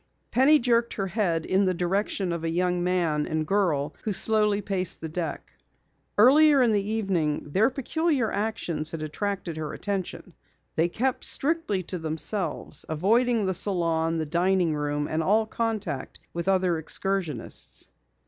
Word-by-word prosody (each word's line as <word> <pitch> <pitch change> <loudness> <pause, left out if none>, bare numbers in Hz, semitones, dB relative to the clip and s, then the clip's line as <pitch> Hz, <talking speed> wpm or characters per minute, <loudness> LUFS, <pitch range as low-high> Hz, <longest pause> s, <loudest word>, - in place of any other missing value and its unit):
Penny 270 +6 +5
jerked 235 -3 +1
her 195 - -2
head 185 -5 -1
in 195 +1 +2
the 185 -1 +1
direction 185 +1 -1
of 170 -1 -4
a 165 - -1
young 180 +1 0
man 170 -5 0
and 155 0 -1
girl 155 -6 0
who 215 - -1
slowly 210 0 +2
paced 190 -3 -2
the 160 - -6
deck. 155 - -5 0.6
Earlier 280 +5 +6
in 235 - +3
the 205 -1 +2
evening 190 -9 -1
their 210 - +3
peculiar 275 -1 0
actions 180 -7 -2
had 160 -1 -5
attracted 175 +1 -3
her 155 -1 -4
attention. 195 -3 -4 0.4
They 165 +2 +2
kept 255 +7 -1
strictly 285 - 0
to 180 +1 -5
themselves, 160 +5 -1
avoiding 220 +7 +2
the 190 - 0
salon, 165 -3 +1
the 160 - -1
dining 175 +1 +1
room, 145 0 -2
and 160 +1 -1
all 215 +6 +3
contact 215 - -3 0.2
with 170 +2 -4
other 185 -3 +2
excursionists. 170 - -2
185 Hz, 150 wpm, -26 LUFS, 160-215 Hz, 0.6 s, Earlier